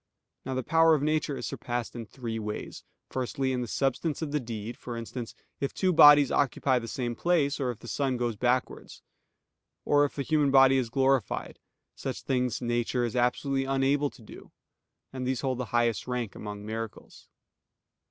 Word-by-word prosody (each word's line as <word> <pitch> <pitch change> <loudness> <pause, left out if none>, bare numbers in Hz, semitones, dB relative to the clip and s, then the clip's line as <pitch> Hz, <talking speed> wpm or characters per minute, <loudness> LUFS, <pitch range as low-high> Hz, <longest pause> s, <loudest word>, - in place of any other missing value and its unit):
Now 130 0 -3
the 130 - -1
power 165 +3 +5
of 145 - -2
nature 155 -1 0
is - - -5
surpassed 120 -2 -4
in 115 -2 -6
three 115 -3 -5
ways: 105 -1 -6 0.3
firstly, 130 +1 -1
in 125 - -1
the 120 - -3
substance 140 +6 -1
of 150 - -4
the 150 - +1
deed, 115 -2 -6
for 120 -1 -7
instance, 115 +1 -6 0.2
if 140 - -3
two 185 -1 +2
bodies 145 -3 +8
occupy 130 -1 +2
the 115 - -7
same 120 0 -3
place, 150 -4 +1
or 130 -3 0
if 120 - -4
the 120 - -13
sun 135 0 -1
goes 120 -2 -1
backwards; 125 +3 -2 0.8
or 145 0 +4
if 145 - -2
a 140 - -1
human 150 -1 +2
body 135 0 +6
is 125 -3 -1
glorified: 135 -3 0 0.4
such - - -5
things 125 -2 -1
nature 120 +1 0
is 120 +1 -4
absolutely 135 +2 +1
unable 135 +2 +1
to 120 - -17
do; - - -13 0.6
and 130 -1 -4
these 130 -1 -1
hold 130 -2 -1
the 125 - -2
highest 120 -1 0
rank 125 -5 -3
among 105 0 -7
miracles. 110 0 -7
130 Hz, 180 wpm, -28 LUFS, 120-140 Hz, 0.8 s, bodies